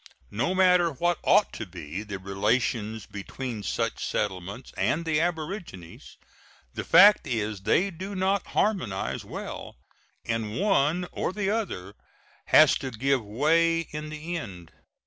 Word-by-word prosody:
No 130 - -1
matter 180 -2 +5
what 175 +4 0
ought 210 - +3
to 110 - -6
be 85 0 -7
the 105 -2 -6
relations 105 +3 -1
between 110 +4 -6
such - - -2
settlements 100 +4 -3
and 165 +2 0
the 155 -1 +1
aborigines, 160 - -5 0.6
the - - -4
fact 200 +4 +7
is 110 -3 -2
they 190 - +2
do 190 +4 -7
not 190 +1 0
harmonize 180 - 0
well, - - -7 0.5
and 115 -1 -2
one 180 -3 +2
or - - -2
the 200 0 -1
other 100 - -3 0.5
has - - +7
to 135 - -4
give 130 +1 0
way 165 +10 +2
in 150 0 -5
the 155 +3 -5
end. 90 - -8
140 Hz, 135 wpm, -27 LUFS, -, 0.6 s, fact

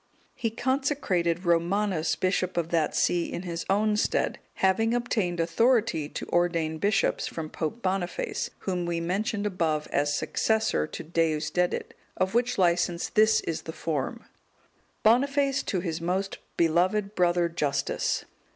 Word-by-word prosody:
He 230 - -2
consecrated 220 - 0
Romanus 170 -1 +1
bishop 185 +1 0
of 165 -1 0
that 165 -3 +1
see 175 -1 +1
in 175 - -4
his 170 -2 -5
own 210 +2 +2
stead, - - 0 0.2
having 225 +5 +2
obtained 215 -8 -1
authority 170 - +2
to - - -6
ordain 165 -2 +1
bishops 205 +3 +1
from 160 -2 -6
Pope 175 +9 -4
Boniface, 185 -2 -2
whom 180 -2 -2
we 170 -1 -1
mentioned 200 +5 -1
above 165 -6 0
as 145 +1 +1
successor 220 - +1
to - - -7
Deusdedit: 165 +1 0 0.2
of 190 +2 0
which 245 +1 +1
licence 175 -1 +1
this 220 +1 +4
is 165 - -3
the 160 - -6
form: 150 -6 -3 0.8
"_Boniface, 275 +4 +3
to 185 - 0
his 165 -2 -3
most 190 +3 -2 0.2
beloved 185 +5 +2
brother 175 -2 +2
Justus. 150 -4 -1
180 Hz, 135 wpm, -27 LUFS, 165-210 Hz, 0.8 s, this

